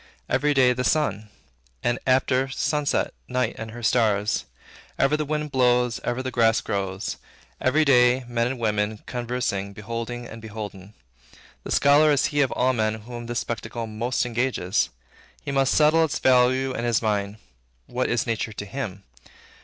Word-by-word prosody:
Every 145 +3 +1
day, 125 -2 +5
the 125 +1 -2
sun; 110 -9 0 0.5
and, 120 0 +1
after 130 0 +2
sunset, 145 +2 0
night 125 -2 0
and 110 - -5
her 120 +2 -9
stars. 110 -3 +2 0.5
Ever 135 +2 +3
the 155 0 -1
winds 150 0 -2
blow; 125 -2 +3 0.2
ever 125 +2 -2
the 130 - -3
grass 115 -2 +3
grows. 95 -1 -3 0.4
Every 155 +5 +3
day, 125 -1 +4
men 120 -1 0
and 130 +1 -3
women, 105 -1 -1
conversing, 120 -5 -3
beholding 115 +3 -5
and 115 -1 -10
beholden. 105 -2 -8 0.7
The - - -8
scholar 145 +2 +5
is 145 - +3
he 145 - +3
of 135 - +2
all 130 +1 +2
men 110 -2 -1
whom 120 +1 -8
this 120 0 -3
spectacle 115 0 -4
most 115 +4 -1
engages. 120 -5 0 0.6
He - - -2
must 135 -1 +2
settle 155 +2 +4
its 160 - -1
value 130 +1 +3
in 120 - -3
his 120 -1 +1
mind. 105 -1 -1 0.5
What 125 +1 -2
is 120 -2 0
nature 115 -2 -2
to 105 - -6
him? 100 -4 -5
120 Hz, 160 wpm, -24 LUFS, 110-130 Hz, 0.7 s, day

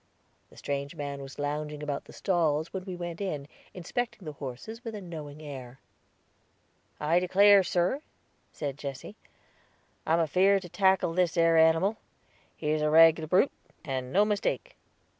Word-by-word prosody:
The - - -19
strange 140 +2 -4
man 140 -2 -5
was 135 0 -10
lounging 150 +1 -3
about 145 -1 -3
the - - -14
stalls 160 -4 0
when 190 -1 -5
we 185 -2 -5
went 175 0 -6
in, 150 -8 -3 0.2
inspecting 195 +3 -4
the 155 - -4
horses 145 - -8
with 225 -3 -6
a - - -5
knowing 155 -5 -8
air. 130 -3 -9 1.2
"I 160 +4 +3
declare, 200 +2 +6
sir," 180 +9 0 0.5
said 145 -1 -5
Jesse, 140 +7 -7 0.9
"I 160 - +2
am 165 - +4
afeared 190 +5 +3
to 180 - -9
tackle 190 -2 +2
this 180 0 +1
ere 165 0 +4
animal; 165 +6 +4 0.6
he's 155 0 -1
a 150 - +2
reglar 160 0 +6
brute, 185 - +4 0.3
and 130 -2 -3
no 205 +6 +4
mistake." 210 -1 -2
165 Hz, 155 wpm, -28 LUFS, 145-185 Hz, 1.2 s, declare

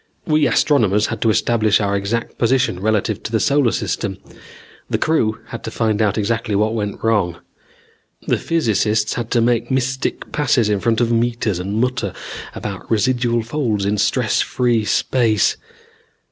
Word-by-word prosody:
We 155 -2 +3
astronomers 110 -5 +2
had - - -4
to 115 - +3
establish 110 -1 +2
our 100 -1 0
exact 105 +4 -3
position 125 -6 +1
relative 110 0 0
to - - -6
the 110 - +1
solar 140 -3 +2
system. 95 -3 -2 0.7
The - - +1
crew 115 -9 +1
had - - -7
to - - -3
find 110 -1 0
out 105 -1 +1
exactly 110 0 -1
what 110 +2 +1
went 105 -2 -4
wrong. 100 -7 +1 0.9
The - - +1
physicists 110 - +1
had 120 -2 -4
to 120 - +2
make 120 0 +1
mystic 130 0 -2
passes 125 -6 +2
in 105 -1 +1
front 115 +3 +1
of 120 -1 +1
meters 115 -4 0
and 95 +3 -4
mutter 125 +1 -1 0.4
about - - -6
residual 120 +1 +1
folds 115 -5 -1
in 105 +1 0
stress 100 - +1
free 120 -3 0
space. 110 -3 +2
115 Hz, 160 wpm, -19 LUFS, 105-120 Hz, 0.9 s, We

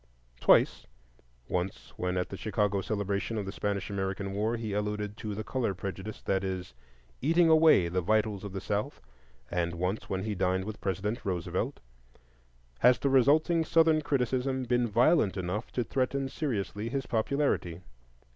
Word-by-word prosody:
Twice—once - - -1
when 90 0 -2
at 90 - -1
the - - -6
Chicago 105 -1 0
celebration 100 +2 -2
of 105 - -2
the 95 - -4
Spanish 100 0 -2
American 95 0 -3
War 110 +4 0
he 110 -3 -4
alluded 105 0 -2
to 105 -3 -5
the 110 - -4
color 115 -5 -1
prejudice 95 +3 -6
that 95 0 0
is 95 -6 -4 0.5
"eating 165 +4 +4
away 155 - +6
the 90 +2 -1
vitals 105 +1 +1
of 100 - -6
the 95 0 -5
South," 105 +8 -2 0.5
and 85 -1 -1
once 90 +5 -2
when 95 0 -2
he 110 0 -2
dined 95 0 0
with 110 0 -7
President 100 +5 -2
Roosevelt—has - - -2
the 140 - 0
resulting 155 +6 +4
Southern 160 -1 +4
criticism 130 -1 0
been 120 0 +1
violent 115 - +3
enough 95 +4 -3
to 125 - 0
threaten 135 +2 -1
seriously 115 -6 -3
his 135 +1 -2
popularity. 110 - 0
105 Hz, 150 wpm, -29 LUFS, 90-125 Hz, 0.5 s, away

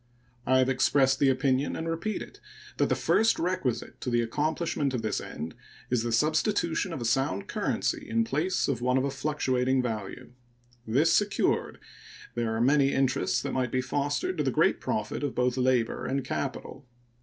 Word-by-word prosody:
I 130 - +4
have 130 0 +3
expressed 135 +1 +3
the 140 - +4
opinion, 130 +1 +1
and 165 - -4
repeat 165 +6 -2
it, - - -14 0.4
that - - +2
the - - +2
first 225 +1 +2
requisite 170 -9 -2
to - - -3
the 120 -1 +2
accomplishment 150 +2 -1
of 115 - -3
this 110 - -1
end 80 +1 -6 0.4
is 125 -2 +2
the 120 0 -2
substitution 160 - +1
of 160 - -5
a - - -3
sound 115 -5 0
currency - - -2
in 115 0 +2
place 155 +11 0
of 125 -4 -1
one 125 +1 +2
of 130 - +1
a 140 - -1
fluctuating 135 -2 0
value. 110 -2 -5 0.6
This 135 +9 +3
secured, 205 -1 +1 0.5
there 120 -1 -1
are 110 - -1
many 140 +2 +4
interests 135 0 +1
that 140 - -3
might 130 -2 -1
be 130 - +1
fostered 145 - -1
to - - +2
the - - +1
great - - +2
profit - - -2
of 145 -3 -3
both 125 0 +1
labor 125 -3 +1
and 135 0 -1
capital. 135 0 -5
130 Hz, 180 wpm, -28 LUFS, 125-150 Hz, 0.6 s, I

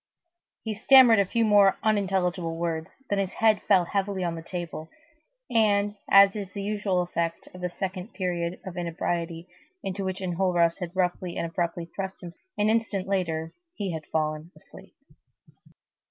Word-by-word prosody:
He 220 - -3
stammered 235 0 +7
a 200 - +2
few 230 +3 +1
more 205 -2 +5
unintelligible 185 -5 0
words, 165 -1 -2 0.2
then 200 - +2
his 195 -1 -2
head 220 -2 +3
fell 185 -4 +5
heavily 195 0 -2
on 170 -1 -1
the 165 - -6
table, 165 -2 -6 0.6
and, 205 -3 +2
as 195 0 +7
is 200 -3 -5
the 200 - -4
usual 205 -3 0
effect 170 -1 -3
of 180 - -11
the 180 - -1
second 185 +3 -5
period 175 -2 -2
of 185 -1 -7
inebriety, 170 0 -3 0.4
into 195 +1 -3
which 190 0 -3
Enjolras 175 -2 +1
had 180 -1 -6
roughly 180 -1 -1
and - - -1
abruptly 170 0 -2
thrust 190 -1 -5
him, 170 -1 -8 0.2
an 210 - +2
instant 220 -4 0
later 165 -5 -1 0.2
he 195 - -3
had 160 -2 -6
fallen 155 +1 -1
asleep. - - -16
185 Hz, 160 wpm, -26 LUFS, 170-200 Hz, 0.6 s, stammered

